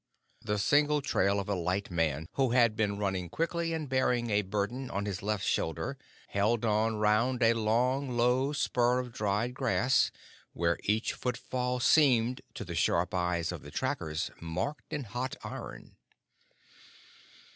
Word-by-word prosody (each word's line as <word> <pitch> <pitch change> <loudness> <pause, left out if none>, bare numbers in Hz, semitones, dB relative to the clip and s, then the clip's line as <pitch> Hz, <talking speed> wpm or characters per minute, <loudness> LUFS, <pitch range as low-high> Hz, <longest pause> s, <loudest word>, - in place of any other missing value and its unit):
The 105 - -1
single 145 +7 +3
trail 100 -6 +2
of 100 - -4
a 100 - 0
light 90 +2 -2
man 80 -2 0
who 130 -3 +1
had 120 -3 +4
been 105 -2 0
running 95 -4 -2
quickly 170 - -1
and 160 -2 -3
bearing 125 -3 +1
a 105 0 +3
burden 105 +6 -3
on 100 +1 -2
his 100 -2 -3
left 105 -1 -1
shoulder, 80 -2 -1 0.3
held 110 +3 +1
on 110 +1 +2
round 110 +4 +2
a 115 0 +5
long, 125 +5 +1
low 125 +3 +2
spur 125 -4 +1
of 125 -1 -3
dried 105 +3 -1
grass, 130 0 +2 0.4
where 85 0 0
each 110 +3 +1
footfall 125 0 -2
seemed, 125 -3 +4
to 120 - -5
the 85 - -6
sharp 85 +1 +1
eyes 90 -2 0
of - - -6
the - - -10
trackers, 75 0 -2
marked 90 - -4
in 150 -3 -2
hot 120 +4 -4
iron. - - -8
115 Hz, 155 wpm, -30 LUFS, 100-125 Hz, 0.4 s, a